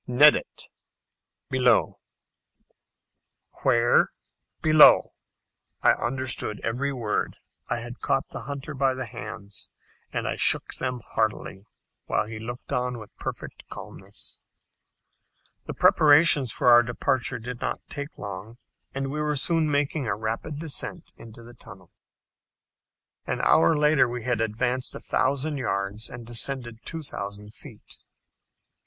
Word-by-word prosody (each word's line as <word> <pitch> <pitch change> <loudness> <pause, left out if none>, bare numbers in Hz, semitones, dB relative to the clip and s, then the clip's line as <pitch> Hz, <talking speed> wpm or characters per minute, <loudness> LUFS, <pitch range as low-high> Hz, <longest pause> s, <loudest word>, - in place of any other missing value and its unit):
"Nedat." 145 +5 +4 0.9
("Below.") 125 -3 +3 1.6
"Where? 120 -2 +4 0.5
below!" 155 -1 +6 0.7
I - - +7
understood 120 -3 0
every 130 +5 -1
word. 115 -6 -2 0.3
I 120 -1 -1
had 120 +1 -8
caught 135 - 0
the - - -8
hunter 140 +2 -6
by 135 -1 +1
the 130 0 -4
hands, 105 -3 -7 0.4
and - - -2
I - - -2
shook - - +3
them 125 -2 -3
heartily, 110 -2 -2 0.4
while - - +1
he 110 0 -7
looked 120 +3 -8
on 125 0 -1
with 110 -2 -12
perfect - - -7
calmness. - - -8 1.3
The - - -5
preparations 145 -3 +5
for 125 - +2
our 120 0 +9
departure 125 +2 -1
did 120 +1 -7
not - - -2
take 145 +1 -7
long, 100 +3 -8 0.4
and 135 0 -2
we 150 +1 -3
were 150 0 0
soon 160 +2 +2
making 145 -1 0
a 100 - 0
rapid 110 +8 -4
descent 155 -3 -4
into 115 0 -13
the 120 +1 -13
tunnel. 95 -6 -14 1.4
An - - -2
hour 85 - +5
later 150 -4 +4
we 120 -1 -5
had 120 -2 0
advanced 125 +3 -1
a - - -6
thousand 140 +3 0
yards, 100 -3 -3
and 120 -1 -9
descended 120 0 -2
two 165 -1 -5
thousand 105 -5 -5
feet. - - -12
125 Hz, 130 wpm, -26 LUFS, 110-140 Hz, 1.6 s, our